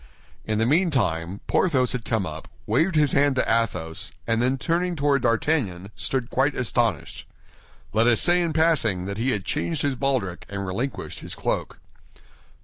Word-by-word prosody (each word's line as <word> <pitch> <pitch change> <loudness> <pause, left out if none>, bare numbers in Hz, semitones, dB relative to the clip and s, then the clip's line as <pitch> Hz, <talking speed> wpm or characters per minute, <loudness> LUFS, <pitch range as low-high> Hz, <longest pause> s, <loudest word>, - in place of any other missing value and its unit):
In 110 -1 -1
the 110 - +2
meantime, 115 - +1
Porthos 130 -9 +2
had 125 -2 -3
come 110 -5 0
up, 80 -1 -7 0.2
waved 160 - +1
his 150 -2 +4
hand 140 -1 +3
to 130 - +1
Athos, 110 -8 -1
and 115 0 +1
then 130 +2 +1
turning 175 +5 0
toward 140 -2 +2
D'Artagnan, 115 - 0
stood 130 -2 -2
quite 135 +2 +1
astonished. 115 - -1 0.7
Let 110 +2 +3
us 120 -2 +4
say 175 0 +3
in 170 -2 0
passing 150 - +2
that 100 +2 -5
he 125 +4 +1
had 105 -7 -1
changed 160 -4 -1
his 140 -1 +1
baldric 130 -10 -1
and 100 -1 -4
relinquished 120 +9 -4
his - - -7
cloak. - - -2
125 Hz, 165 wpm, -24 LUFS, 105-145 Hz, 0.7 s, his